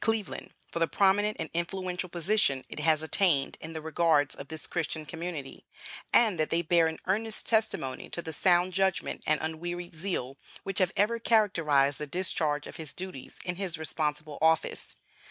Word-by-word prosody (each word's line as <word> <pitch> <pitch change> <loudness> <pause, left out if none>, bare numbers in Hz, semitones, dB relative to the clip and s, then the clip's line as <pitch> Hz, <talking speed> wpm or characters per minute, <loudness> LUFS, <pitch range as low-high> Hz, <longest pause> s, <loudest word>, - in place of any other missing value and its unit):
D. - - -2
Cleveland 225 -2 -2 0.2
for - - -3
the 165 - +3
prominent 205 +3 +2
and 160 - -4
influential 180 +1 -3
position 170 -6 +1
it - - -7
has 155 0 +3
attained 160 -4 +2
in 160 +1 -7
the 160 -1 -6
regards 160 -3 +2
of 140 - -8
this 160 -1 -7
Christian 160 -2 -3
community, 165 -4 -6 0.5
and 215 -8 +4
that 155 - +1
they 170 +1 +1
bear 165 0 +4
an 160 - -4
earnest 215 +3 -1
testimony 220 - +2
to 170 - -5
the 160 - -5
sound 180 +3 +3
judgment 190 -1 0
and 155 0 +3
unwearied 175 +2 -4
zeal 155 -6 -3 0.3
which 195 -1 -3
have 185 -2 +3
ever 230 +3 +2
characterized 160 - +3
the 150 - -3
discharge 155 -3 0
of - - -9
his 155 -4 -6
duties 185 -7 -7
in 180 -1 -2
his 185 -4 -2
responsible 150 -1 -2
office." 160 0 +2
170 Hz, 175 wpm, -29 LUFS, 155-190 Hz, 0.5 s, and